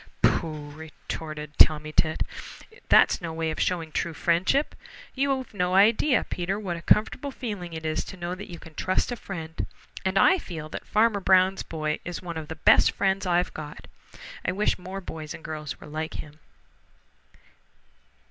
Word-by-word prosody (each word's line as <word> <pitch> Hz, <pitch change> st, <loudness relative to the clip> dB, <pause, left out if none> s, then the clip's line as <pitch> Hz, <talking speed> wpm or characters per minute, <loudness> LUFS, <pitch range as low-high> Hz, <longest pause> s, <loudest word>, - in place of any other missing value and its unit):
"Pooh!" 150 Hz, -3 st, +1 dB
retorted 155 Hz, 0 st, -7 dB
Tommy 155 Hz, 0 st, +6 dB
Tit. 155 Hz, 0 st, +2 dB, 0.7 s
"That's -, -, +6 dB
no 170 Hz, -2 st, -4 dB
way 160 Hz, 0 st, -1 dB
of 155 Hz, -, -5 dB
showing 165 Hz, -3 st, 0 dB
true 165 Hz, +1 st, -2 dB
friendship. 180 Hz, -, +2 dB, 0.4 s
You've 270 Hz, -2 st, -1 dB
no 180 Hz, -2 st, 0 dB
idea, 225 Hz, +6 st, +5 dB
Peter, 185 Hz, +3 st, -2 dB
what 185 Hz, -5 st, -3 dB
a 170 Hz, -, -7 dB
comfortable 235 Hz, +9 st, +2 dB
feeling 205 Hz, -10 st, -5 dB
it 160 Hz, 0 st, -6 dB
is 155 Hz, 0 st, 0 dB
to 190 Hz, -, -9 dB
know 175 Hz, 0 st, -3 dB
that 195 Hz, +2 st, -8 dB
you 175 Hz, -, -7 dB
can 160 Hz, -1 st, -13 dB
trust 185 Hz, +9 st, 0 dB
a -, -, -1 dB
friend, 165 Hz, -7 st, -6 dB, 0.4 s
and 190 Hz, 0 st, 0 dB
I 375 Hz, -, +6 dB
feel 160 Hz, -, -7 dB
that -, -, -7 dB
Farmer 215 Hz, -1 st, +3 dB
Brown's 190 Hz, 0 st, +4 dB
boy 155 Hz, -1 st, -3 dB
is 175 Hz, -, -5 dB
one 170 Hz, -2 st, -6 dB
of 155 Hz, -1 st, -5 dB
the 160 Hz, -, -6 dB
best -, -, +5 dB
friends 195 Hz, 0 st, 0 dB
I've 175 Hz, 0 st, +1 dB
got. 150 Hz, -1 st, -8 dB, 0.6 s
I -, -, 0 dB
wish 210 Hz, 0 st, +1 dB
more 190 Hz, +2 st, -6 dB
boys 155 Hz, -4 st, -7 dB
and 160 Hz, -, -12 dB
girls 150 Hz, -3 st, -5 dB
were -, -, -11 dB
like 155 Hz, +1 st, -4 dB
him." 150 Hz, 0 st, -8 dB
175 Hz, 175 wpm, -26 LUFS, 155-195 Hz, 0.7 s, Tommy